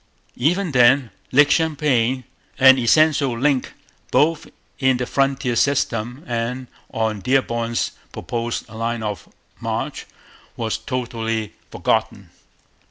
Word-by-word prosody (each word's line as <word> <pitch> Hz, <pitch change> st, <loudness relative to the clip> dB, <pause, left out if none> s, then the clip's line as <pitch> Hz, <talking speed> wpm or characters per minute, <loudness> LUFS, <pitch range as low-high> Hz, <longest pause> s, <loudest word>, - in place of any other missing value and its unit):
Even 175 Hz, +7 st, +1 dB
then 125 Hz, -1 st, +4 dB, 0.2 s
Lake 145 Hz, +2 st, +5 dB
Champlain, 135 Hz, -6 st, +1 dB, 0.3 s
an 130 Hz, 0 st, +7 dB
essential 140 Hz, 0 st, +3 dB
link 135 Hz, 0 st, 0 dB, 0.3 s
both 160 Hz, +1 st, +2 dB, 0.3 s
in 130 Hz, -2 st, +3 dB
the 125 Hz, -, -2 dB
frontier 135 Hz, -2 st, 0 dB
system 125 Hz, -1 st, 0 dB
and 120 Hz, +2 st, -3 dB, 0.3 s
on 110 Hz, -2 st, -1 dB
Dearborn's 115 Hz, 0 st, 0 dB, 0.2 s
proposed 120 Hz, 0 st, -4 dB
line 115 Hz, +1 st, -3 dB
of 105 Hz, -2 st, -5 dB, 0.3 s
march, -, -, -4 dB, 0.5 s
was 110 Hz, -2 st, -2 dB
totally 115 Hz, -4 st, -3 dB, 0.2 s
forgotten. -, -, -1 dB
125 Hz, 100 wpm, -21 LUFS, 115-140 Hz, 0.5 s, an